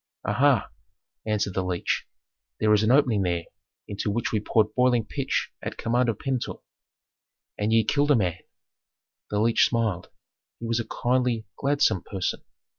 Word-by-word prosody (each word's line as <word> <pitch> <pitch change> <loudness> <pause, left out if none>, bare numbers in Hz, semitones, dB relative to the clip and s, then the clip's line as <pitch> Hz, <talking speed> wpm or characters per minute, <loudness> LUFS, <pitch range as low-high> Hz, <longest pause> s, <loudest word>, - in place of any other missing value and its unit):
"Aha!" - - +2 0.6
answered 105 -2 0
the 95 - -1
leech. 90 -1 -2 0.5
"There 105 0 +4
is 105 - +4
an 110 - +2
opening 125 -6 +4
there 85 -2 0 0.4
into 100 +1 -3
which 115 +3 -1
we 110 - +1
poured 105 +1 +1
boiling 125 -2 +3
pitch - - -2
at - - -5
command 120 +1 +1
of 110 - -1
Pentuer." 130 -1 -3 1.0
"And 105 +1 0
ye 115 0 +4
killed 145 +7 +1
a 145 - +6
man 90 -6 0 0.5
" - - -66
The 105 - -1
leech 115 +2 +3
smiled. 110 -7 -1 0.5
He 115 - -6
was 115 0 0
a 120 - -4
kindly, 125 -2 0
gladsome 140 -9 +2
person. 95 -3 -3
110 Hz, 160 wpm, -26 LUFS, 105-120 Hz, 1.0 s, a